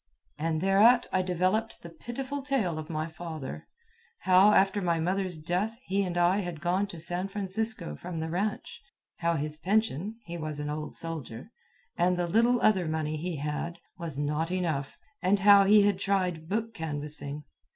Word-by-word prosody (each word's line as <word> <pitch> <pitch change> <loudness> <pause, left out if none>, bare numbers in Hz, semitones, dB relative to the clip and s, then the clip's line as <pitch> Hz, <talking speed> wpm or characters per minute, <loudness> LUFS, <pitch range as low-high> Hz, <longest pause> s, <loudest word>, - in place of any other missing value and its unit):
And 160 0 -1
thereat 210 +6 +5
I 185 - +2
developed 185 +5 -1
the 170 - -9
pitiful 260 - -5
tale 235 - -1
of 155 - -8
my 155 -1 -2
father 160 -4 -7 0.5
how, 190 +2 +6
after 195 0 +3
my 170 -2 +1
mother's 185 +1 -1
death, 180 +8 -2
he 195 +2 0
and 180 -3 -2
I 175 +3 +3
had 175 -5 -4
gone 180 +5 0
to 175 -4 -9
San 175 +3 -1
Francisco 200 - -2
from 165 - -6
the 160 - -2
ranch; 200 +4 -3 0.4
how 170 0 +1
his 150 0 -3
pension 200 +1 0
(he 175 -2 -6
was 155 -2 -4
an 150 0 -3
old 150 0 -5
soldier), 160 - -5 0.5
and 180 +1 +3
the 175 -1 0
little 235 +6 +3
other 190 -5 +3
money 155 -1 -2
he 170 +3 -3
had, 150 +4 -3 0.2
was 165 -5 -4
not 150 +3 -1
enough; 165 -7 -2 0.2
and 195 +1 +2
how 200 0 +8
he 205 +1 +6
had 200 -2 +2
tried 180 -5 -1
book 225 +3 -2
canvassing. 150 -3 -5
175 Hz, 170 wpm, -29 LUFS, 160-200 Hz, 0.5 s, how